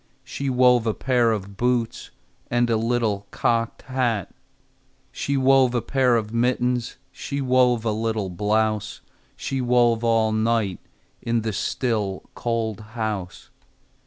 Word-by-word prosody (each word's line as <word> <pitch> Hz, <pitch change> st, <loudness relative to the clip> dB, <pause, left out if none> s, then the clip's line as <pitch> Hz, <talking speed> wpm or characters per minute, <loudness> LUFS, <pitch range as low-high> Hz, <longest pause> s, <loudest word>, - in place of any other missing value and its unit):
She 140 Hz, -1 st, -4 dB
wove 125 Hz, -2 st, +4 dB
a 110 Hz, -, 0 dB
pair 125 Hz, -3 st, +2 dB
of 100 Hz, -2 st, -4 dB
boots 120 Hz, -1 st, -1 dB, 0.4 s
And 120 Hz, 0 st, +1 dB
a -, -, +3 dB
little 110 Hz, -3 st, 0 dB
cocked 115 Hz, -1 st, -1 dB
hat. 120 Hz, -7 st, -1 dB, 0.8 s
She 140 Hz, 0 st, -2 dB
wove 130 Hz, -1 st, +4 dB
a 120 Hz, -, +1 dB
pair 130 Hz, -3 st, +2 dB
of 110 Hz, -1 st, -2 dB
mittens, 125 Hz, 0 st, 0 dB, 0.2 s
She 140 Hz, -, -5 dB
wove 125 Hz, -3 st, +2 dB
a 110 Hz, -, +1 dB
little 110 Hz, -3 st, -2 dB
blouse, 105 Hz, +2 st, -1 dB, 0.3 s
She 135 Hz, -1 st, -3 dB
wove 120 Hz, -2 st, +3 dB
all 115 Hz, -1 st, +2 dB
night 110 Hz, -3 st, 0 dB, 0.4 s
In 115 Hz, 0 st, 0 dB
the 110 Hz, -1 st, -2 dB
still, 105 Hz, -3 st, -2 dB
cold 115 Hz, -3 st, -2 dB, 0.2 s
house. 105 Hz, -5 st, -4 dB
115 Hz, 130 wpm, -23 LUFS, 110-125 Hz, 0.8 s, wove